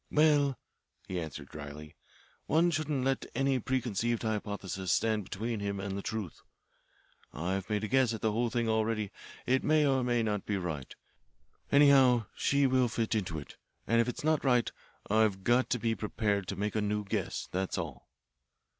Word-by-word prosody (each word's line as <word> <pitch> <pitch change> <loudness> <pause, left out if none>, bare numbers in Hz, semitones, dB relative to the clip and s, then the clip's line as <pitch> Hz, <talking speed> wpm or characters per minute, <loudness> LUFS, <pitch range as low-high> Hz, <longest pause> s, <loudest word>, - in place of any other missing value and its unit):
"Well," 145 -3 +3 0.5
he 90 -1 -2
answered 75 -4 -7
dryly, 75 +1 -9 0.5
"one 170 +2 +3
shouldn't 150 -3 -1
let 135 0 0
any 135 0 +2
preconceived 120 -2 -1
hypothesis 100 -4 -3
stand 110 -2 +1
between 110 +4 -3
him 100 -1 -3
and 95 0 -4
the 100 - -3
truth. 105 -5 -5 0.9
I've 95 +4 -3
made 105 0 0
a - - -1
guess 130 0 +3
at 110 - -4
the 110 - +1
whole 120 +2 0
thing 120 0 -1
already. 110 -2 0 0.3
It 130 +1 +2
may 155 0 +4
or 135 -2 +3
it - - -1
may 120 -1 +1
not 105 -3 -1
be 105 - 0
right. 80 -8 -5 0.8
Anyhow 135 -5 +6
she 140 0 +2
will 130 -1 +3
fit 115 -1 -1
into 95 -7 -1
it. 75 - -9 0.3
And 115 +1 +3
if 115 - 0
it's 125 - -5
not 155 -1 +2
right, 125 -4 +3 0.4
I've 105 -2 +2
got 120 +4 +3
to 125 - +1
be 115 -1 0
prepared 105 -3 -1
to 100 - -3
make 105 +3 -2
a 110 - +1
new 105 0 -1
guess, 95 - -3
that's 95 +1 -2
all." 80 -8 -6
110 Hz, 180 wpm, -31 LUFS, 100-130 Hz, 0.9 s, Anyhow